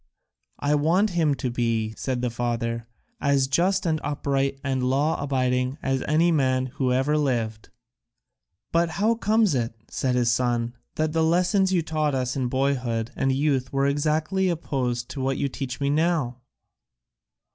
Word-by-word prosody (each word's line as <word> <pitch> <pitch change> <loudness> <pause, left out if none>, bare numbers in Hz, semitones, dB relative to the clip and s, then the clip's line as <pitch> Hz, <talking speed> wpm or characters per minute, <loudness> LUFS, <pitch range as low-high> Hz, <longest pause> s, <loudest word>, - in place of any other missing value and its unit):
"I 145 +1 0
want 170 +8 +2
him 160 -5 +2
to 130 -2 -3
be," 115 -2 -1
said 125 0 -3
the 125 - 0
father, 115 -1 -2 0.3
"as 140 -1 +2
just 180 +8 +1
and 155 -2 0
upright 140 -1 -1
and 135 -2 -1
law 135 +5 +1
abiding 130 -1 0
as 135 -1 0
any 165 +3 +3
man 130 -4 +2
who 130 -3 +1
ever 135 +4 +2
lived." 115 -6 -1 1.0
"But 170 0 +2
how 220 +3 +3
comes 220 -4 +2
it," 120 -3 -1 0.2
said 130 -2 0
his 120 -1 +2
son, 120 0 0 0.2
"that 155 0 0
the 165 -1 +2
lessons 180 +4 +2
you 175 -3 +2
taught 155 -3 0
us 125 -1 -1
in 130 -2 0
boyhood 125 -4 -1
and 135 - +1
youth 135 -2 0
were 135 0 +1
exactly 155 +6 +1
opposed 125 -7 -2
to 135 - -5
what 135 0 0
you 140 - 0
teach 130 -1 -5
me 140 0 +1
now?" 150 -6 0
135 Hz, 160 wpm, -25 LUFS, 125-155 Hz, 1.0 s, any